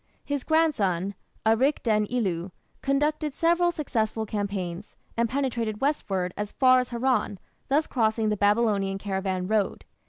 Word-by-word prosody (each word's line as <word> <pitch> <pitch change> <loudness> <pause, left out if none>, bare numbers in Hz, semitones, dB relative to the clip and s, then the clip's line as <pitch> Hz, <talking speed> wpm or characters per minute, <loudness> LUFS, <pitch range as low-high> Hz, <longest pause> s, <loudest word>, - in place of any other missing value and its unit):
His 285 -2 -2
grandson, 200 - +1 0.3
Arik 250 +7 +3
den 215 -2 +2
ilu, 190 -7 -1 0.3
conducted 295 +1 0
several 345 +1 +3
successful 225 -9 -1
campaigns, 200 -3 -4 0.2
and 230 0 +1
penetrated 235 -5 -1
westward 195 -11 -1
as 210 0 -4
far 255 -1 +5
as 250 - -2
Haran, 245 -4 0 0.3
thus 295 +3 +2
crossing 220 -2 +1
the 210 - +1
Babylonian 205 -2 +2
caravan 190 -2 -2
road. 215 -1 0
220 Hz, 130 wpm, -26 LUFS, 200-270 Hz, 0.3 s, far